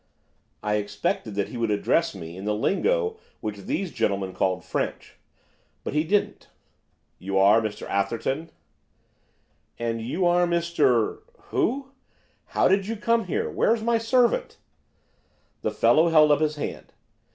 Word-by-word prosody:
I 105 0 +1
expected 105 0 -2
that 100 -1 -1
he 125 - -7
would 115 -1 0
address 105 +8 +1
me 85 -2 -8
in 95 +2 -8
the 105 0 0
lingo 445 - 0 0.2
which 105 -1 -4
these 190 -1 -2
gentlemen 100 -5 -1
call 95 0 0
French, - - -4 0.7
but - - -4
he 150 +1 +2
didn't. 200 +5 -1 0.7
'You 95 +1 -2
are 100 +4 +6
Mr 110 -2 -5
Atherton?' 115 +10 -1 1.3
'And 115 -1 -2
you 160 +11 -1
are 175 0 +3
Mr 165 -9 +1 0.3
Who? 270 +3 0 0.6
how - - +2
did 195 +1 +2
you 225 - -2
come 230 +1 +1
here? 180 - -1
Where's 225 -1 +1
my 235 0 +2
servant?' 245 - +1 1.0
The - - 0
fellow 165 +2 +4
held 155 -2 +6
up 145 - +3
his 155 -1 +1
hand. 150 - -6
150 Hz, 140 wpm, -25 LUFS, -, 1.3 s, are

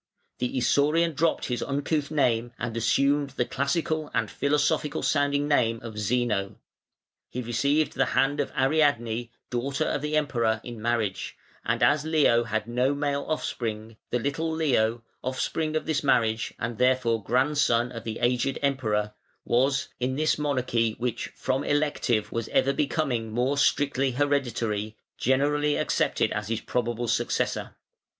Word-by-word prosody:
The 125 +1 -2
Isaurian 150 +6 +2
dropped 160 +3 +1
his 125 -1 -2
uncouth 145 +1 -1
name 120 -5 +1
and 120 -1 -4
assumed 140 +5 +2
the 125 - +2
classical 155 +4 -1
and 115 -3 0
philosophical 145 +1 0
sounding 145 0 +1
name 115 -6 +2
of 110 -2 -6
Zeno; 105 -3 0 0.7
he 125 - -4
received 140 +6 +1
the 135 -1 +1
hand 145 +2 +2
of 145 - -1
Ariadne, 130 -5 +2 0.2
daughter 130 +3 -1
of 145 - -1
the 150 +1 0
Emperor, 115 -7 +1
in 120 -3 -8
marriage, 115 -4 -1 0.3
and - - 0
as 150 0 +4
Leo 150 -7 +3
had 110 -1 -2
no 125 +4 +1
male 140 -1 -1
offspring, 115 -7 -3
the - - +1
little 145 +6 -2
Leo, 120 -8 +1 0.2
offspring 155 +5 -2
of 155 - -1
this 155 -2 0
marriage 115 -4 +2
and 115 -1 -4
therefore 125 -3 +2
grandson 125 -2 +2
of 115 -2 -7
the 110 -1 -4
aged 125 +2 +1
Emperor, 110 -7 0 0.3
was, 135 +3 +1
in 130 +1 -1
this 155 +2 +2
monarchy 125 -6 0
which 120 0 -2
from 130 +1 -1
elective 145 -7 0
was 115 -1 -3
ever 140 - +2
becoming 135 -5 -1
more 125 +5 +1
strictly 140 -2 +2
hereditary, 120 -6 -1 0.2
generally 145 +3 +2
accepted - - +1
as 105 -1 -3
his 115 0 -1
probable 120 -1 -2
successor. - - -1
130 Hz, 145 wpm, -26 LUFS, 115-145 Hz, 0.7 s, as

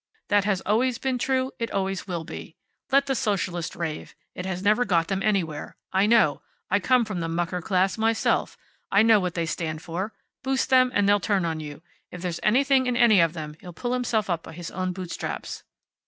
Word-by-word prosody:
That 205 -1 +3
has 195 -3 +1
always 235 +4 +1
been 260 -1 -1
true. 260 +1 0
It 230 0 -2
always 195 -1 -2
will 170 -3 -3
be. 160 - -9 0.4
Let 275 +1 +4
the 275 - 0
Socialists 185 -7 -1
rave. 165 -3 -5 0.2
It 180 - -5
has 185 0 -3
never 215 +4 +4
got 170 -6 +1
them 195 -1 -1
anywhere. 185 -8 -1 0.2
I 190 +2 +3
know. 220 -10 +4 0.3
I 200 - +4
come 250 +3 +3
from 210 -5 -4
the 165 -1 -2
mucker 175 +2 -2
class 190 +2 +1
myself. 225 0 +1 0.3
I 200 +2 +5
know 225 -2 +6
what 180 -2 -2
they 170 -1 0
stand 160 -1 -4
for. 185 +6 -4 0.3
Boost 265 0 -1
them, 255 -1 +6
and 205 -1 +3
they'll 205 0 +5
turn 195 -3 0
on 160 -1 -2
you. 150 +1 -8 0.3
If 180 0 -9
there's 175 -2 -3
anything 265 +3 +3
in 245 -1 0
any 220 -5 +6
of 165 -1 +2
them, 155 -3 -6
he'll 180 - -10
pull 245 +8 -3
himself 240 -4 0
up 170 -3 -1
by - - -11
his 170 0 -7
own 185 0 -2
bootstraps." 180 -1 -5
195 Hz, 210 wpm, -25 LUFS, 175-230 Hz, 0.4 s, know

